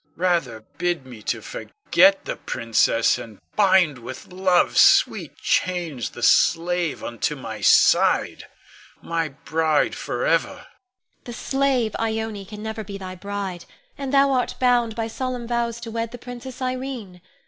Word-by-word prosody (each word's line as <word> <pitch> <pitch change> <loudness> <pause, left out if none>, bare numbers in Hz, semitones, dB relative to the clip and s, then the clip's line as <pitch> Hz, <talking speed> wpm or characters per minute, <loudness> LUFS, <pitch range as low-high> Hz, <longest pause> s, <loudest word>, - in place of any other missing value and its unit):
Rather 165 -11 0 0.2
bid 175 -6 -1
me 120 -4 -11
to - - -2
forget 295 -11 +2
the - - -3
princess 115 0 +1
and 110 -3 -10 0.2
bind 185 - +4
with 130 +8 -10
Love's 185 -1 +3
sweet - - +4
chains 170 - -1
the - - -9
slave 170 +1 +2
unto 120 +5 -2
my 110 -6 -7
side, 95 - +4 0.6
my 165 -1 -1
bride 155 +2 0
forever. - - 0
Ione. - - -14 0.6
The 240 - -7
slave 265 -4 0
Ione 220 -2 -2
can 210 +1 -9
never 220 0 -4
be 200 0 -7
thy 185 -1 -7
bride, 190 -1 -5 0.3
and 275 -2 -5
thou 275 0 +4
art 255 -2 0
bound 245 -3 +2
by 225 -1 -2
solemn 245 +1 -4
vows 235 -1 -1
to 230 -1 -7
wed 230 0 -3
the 245 - -9
Princess 245 +1 -8
Irene. 255 -8 -5
200 Hz, 145 wpm, -23 LUFS, 165-240 Hz, 0.6 s, bind